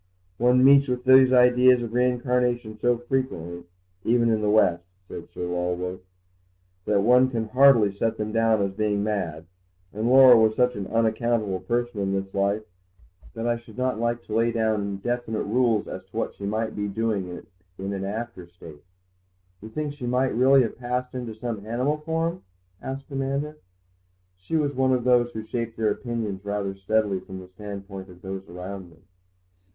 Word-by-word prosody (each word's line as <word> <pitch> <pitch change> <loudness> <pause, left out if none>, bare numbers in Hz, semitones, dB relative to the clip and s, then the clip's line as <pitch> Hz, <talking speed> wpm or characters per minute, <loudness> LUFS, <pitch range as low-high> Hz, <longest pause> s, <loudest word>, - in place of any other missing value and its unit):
"One 125 +1 +4
meets 140 +1 +6
with 125 -1 -2
those 130 0 +6
ideas 125 0 +5
of 115 -1 -6
reincarnation 125 -2 0
so 120 +2 +2
frequently, 115 -9 -3 0.4
even 115 0 +2
in 110 -1 +1
the 105 - 0
West," 90 -5 +3 0.2
said 85 - -9
Sir - - -9
Lulworth, 90 +1 -3 0.9
"that 100 -2 +2
one 125 +4 +5
can 115 -3 -3
hardly 125 -4 +5
set 110 +3 -2
them 105 0 -3
down 115 -2 +2
as 100 - -1
being 105 0 -1
mad. 85 -7 -3 0.5
And 110 +3 -2
Laura 130 -1 +8
was 110 -1 +4
such 125 0 +2
an 100 -2 -5
unaccountable 110 -3 0
person 120 +2 -2
in 95 0 -1
this 95 0 -3
life 100 +2 0 0.7
that 115 0 -4
I 120 0 +1
should 115 -1 -16
not 130 -3 -1
like 120 0 -1
to 105 - -8
lay 115 +1 +2
down 110 -3 -1
definite 120 +1 -3
rules 115 0 +1
as - - -7
to - - -11
what - - -2
she 100 - -6
might 110 +2 -2
be 105 0 -2
doing 100 -4 -3 0.3
in 95 +1 -4
an 95 -1 -4
after 105 -2 -5
state." 85 -4 -14 0.8
"You 110 - -9
think 150 +4 -4
she 130 -4 -6
really 130 +1 +2
might - - +3
have 115 - -5
passed 125 +1 -3
into 120 -3 -5
some 110 -2 -5
animal 125 +7 -1
form?" 165 +3 -2 0.4
asked 135 +2 -7
Amanda. 140 +2 -2 0.8
She 90 - -5
was 145 -2 +1
one 130 0 +2
of 125 -2 0
those 120 -1 +3
who 110 - -5
shape 115 0 -4
their 110 -2 +1
opinions 110 -5 -4
rather 100 -1 -3
readily 105 -3 +1
from 95 +1 -10
the 90 -1 -12
standpoint 100 -1 -8
of 90 0 -16
those 95 0 -7
around 90 +1 -8
them. 80 0 -22
115 Hz, 180 wpm, -25 LUFS, 100-125 Hz, 0.9 s, Laura